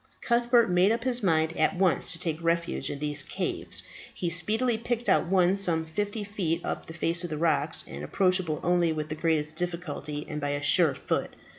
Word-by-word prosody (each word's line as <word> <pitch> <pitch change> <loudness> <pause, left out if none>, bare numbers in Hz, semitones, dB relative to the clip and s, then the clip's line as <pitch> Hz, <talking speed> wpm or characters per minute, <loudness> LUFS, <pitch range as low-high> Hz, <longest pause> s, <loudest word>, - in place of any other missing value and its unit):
Cuthbert 235 -3 +3
made 180 +3 +4
up 230 +1 -1
his 250 -1 -1
mind 160 -3 +1
at 155 +5 +2
once 180 -7 +2
to 175 - -3
take 165 -1 -3
refuge 170 0 0
in 145 - -4
these 145 0 0
caves. - - -3 0.3
He 175 -2 -3
speedily 220 +8 +1
picked 240 0 -2
out - - +3
one 185 0 +3
some 170 -5 +1
fifty 205 +6 -3
feet 180 -5 -2
up - - -4
the 160 - -8
face 170 +1 +2
of 175 - -4
the 155 - -3
rock, 160 -1 +1
and 70 +2 -8
approachable 180 - +1
only 175 -1 +2
with 155 0 -3
the 155 - -3
greatest 155 -1 +1
difficulty 165 -4 -4
and 150 0 -5
by 145 0 -1
a 145 0 -3
sure 150 0 +4
foot. - - -2
170 Hz, 200 wpm, -27 LUFS, 155-195 Hz, 0.3 s, made